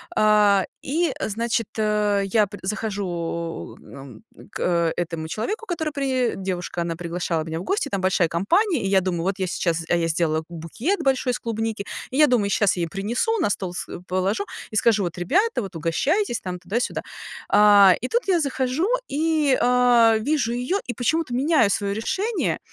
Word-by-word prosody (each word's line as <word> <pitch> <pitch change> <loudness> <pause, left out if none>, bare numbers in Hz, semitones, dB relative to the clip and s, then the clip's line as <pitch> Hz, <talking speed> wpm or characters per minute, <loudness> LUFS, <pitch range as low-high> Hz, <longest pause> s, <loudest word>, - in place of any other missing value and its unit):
А, 210 - +4 0.2
и 330 +5 0
значит, 230 +1 -1
я 210 -1 +1
пр 205 - -9
захожу 180 -5 -4
м 135 - -12
м, - - -16
к 170 -2 0
этому 165 -2 -3
человеку, 405 - -4
который 320 -5 -3
при 260 -4 0
девушка, 180 -2 -4
она 170 -1 -3
приглашала 170 -1 -2
меня 160 0 -5
в - - -6
гости, 345 - -1
там 200 - -2
большая 185 -3 +2
компания. 335 - +1
И 195 - -1
я 195 -1 +3
думаю, 175 -2 -2
вот 195 +2 -1
я 190 - -1
сейчас, 170 -2 -1
а - - +3
я 165 -1 0
сделала 160 -1 +1
б - - -17
букет 175 - -3
большой 265 -1 +1
из - - -3
клубники, 225 -2 -3 0.3
и - - -5
я 300 0 +6
думаю, 235 -6 +2
щас 200 -2 +2
я 175 - 0
ей 170 - -1
принесу, 235 - -1
на 335 - +1
стол 185 -3 -3
с - - -4 0.2
положу 190 +3 -1 0.3
и 215 - -2
скажу: 220 -3 +3
"Bот, 175 - -5
ребята, 370 - +1
вот 195 -4 -8
угощайтесь". 240 - 0
Tам, 180 -1 -5
туда-сюда. 205 +8 -2 0.5
А, 205 -2 +7
и 250 - -2
тут 475 - -1
я 360 -2 +4
захожу 275 +3 -1 0.2
и 305 -2 +1
а, 245 -2 +5
вижу 245 -1 0
её, 250 +11 -1
и 245 - -2
почему-то 275 +2 -1
меняю 270 -3 +3
своё 200 -1 0
решение, 390 - -1
210 Hz, 180 wpm, -23 LUFS, 180-260 Hz, 0.5 s, А